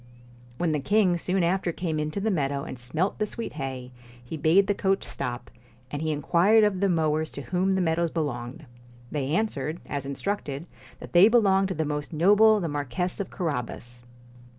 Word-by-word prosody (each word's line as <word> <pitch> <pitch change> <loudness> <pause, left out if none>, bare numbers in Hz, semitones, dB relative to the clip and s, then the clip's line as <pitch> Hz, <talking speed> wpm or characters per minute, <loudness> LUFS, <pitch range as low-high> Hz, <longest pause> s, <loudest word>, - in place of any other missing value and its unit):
When 170 +1 0
the 150 - 0
king 195 +3 +3
soon 180 +2 0
after 175 +1 +1
came 160 -2 -3
into 155 +5 -2
the 215 +2 0
meadow 140 -5 -1
and 130 - -7
smelt 155 +11 -2
the 215 - 0
sweet 230 +2 -6
hay, 130 -3 -5 0.3
he 120 - -7
bade 160 +6 +4
the 205 - +1
coach 195 -1 0
stop, 120 -1 -5 0.4
and 145 - -4
he 160 0 0
inquired 175 +9 +4
of 205 -3 +2
the 200 0 +2
mowers 155 -2 +1
to 140 - -6
whom 185 +4 0
the 190 - +1
meadows 170 0 +1
belonged. 145 -2 -4 0.5
They 140 -3 -2
answered, 170 -6 -1
as 140 -1 -4
instructed, 145 -1 -3 0.3
that - - -11
they 175 +4 +8
belonged 195 -5 +4
to 190 - -4
the 160 0 -1
most 150 +2 -4
noble 210 +6 +5
the 175 - -2
Mar 145 -1 -2
quess 180 +8 -2
of 200 - -3
Carabas. 125 -7 -4
165 Hz, 190 wpm, -26 LUFS, 145-195 Hz, 0.5 s, they